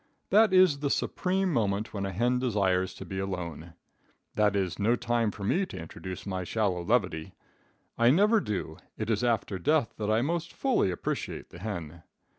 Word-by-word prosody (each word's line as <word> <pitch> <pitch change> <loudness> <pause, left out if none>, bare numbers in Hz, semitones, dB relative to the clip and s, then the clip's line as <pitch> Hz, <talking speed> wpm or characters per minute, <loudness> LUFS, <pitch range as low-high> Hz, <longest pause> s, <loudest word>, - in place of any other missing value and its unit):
That 215 0 +6
is 185 -6 +5
the 140 -1 -1
supreme 185 +4 0
moment 105 -3 0
when 100 -2 -2
a - - -4
hen 120 +6 +1
desires 95 -6 +1
to - - -8
be 95 - -5
alone. 85 -4 -5 0.6
That 105 -1 +2
is 95 -2 -1
no 110 +4 +3
time 120 -2 0
for 100 0 -8
me 175 - +2
to - - -8
introduce 90 +3 -7
my 95 -2 -3
shallow 95 -3 -1
levity, 90 -7 0 0.6
I 120 +1 +6
never 205 - +5
do 95 - -4 0.2
it 110 +1 -2
is 110 +2 0
after 110 -5 0
death 150 - +2
that 105 -1 -2
I 110 +2 +3
most 170 +3 -2
fully 265 - +1
appreciate 90 - -4
the 85 - -11
hen. 85 -6 -6
105 Hz, 180 wpm, -29 LUFS, 95-125 Hz, 0.6 s, That